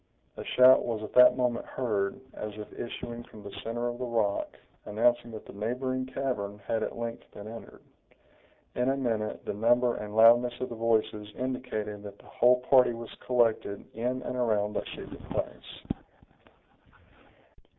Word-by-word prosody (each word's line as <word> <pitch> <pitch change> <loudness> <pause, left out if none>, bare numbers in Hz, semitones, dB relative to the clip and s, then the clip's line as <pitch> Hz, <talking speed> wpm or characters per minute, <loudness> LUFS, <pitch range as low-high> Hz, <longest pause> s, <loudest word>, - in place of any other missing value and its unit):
A - - -6
shout 130 +1 +6
was 115 -2 -3
at 110 - -7
that 125 +1 +8
moment 125 -2 0
heard, 105 -6 -1
as 105 -1 -6
if 105 - -8
issuing 120 0 -6
from 105 - -13
the 100 - -8
center 120 +1 -2
of 120 0 -4
the - - -3
rock, 110 -4 0 0.3
announcing 120 +3 +2
that 110 -2 -8
the - - -11
neighboring 130 +5 -2
cavern 105 -7 -3
had 115 -1 0
at - - -3
length 115 0 -5
been 105 - -8
entered. 115 +1 -10 0.9
In 125 +1 +1
a 135 - +1
minute, 115 -5 -2
the - - -2
number 120 +3 +3
and 105 0 -6
loudness 120 +2 +6
of 130 - -3
the 120 - -6
voices 110 -2 0
indicated 125 -5 -3
that 100 -1 -9
the - - -20
whole 125 +1 +4
party 125 -1 +5
was 115 -1 -8
collected 115 -5 +1
in 125 +3 -2
and - - -4
around 105 -4 +1
that - - -3
secret - - -9
place. - - -5
115 Hz, 165 wpm, -29 LUFS, 105-125 Hz, 0.9 s, that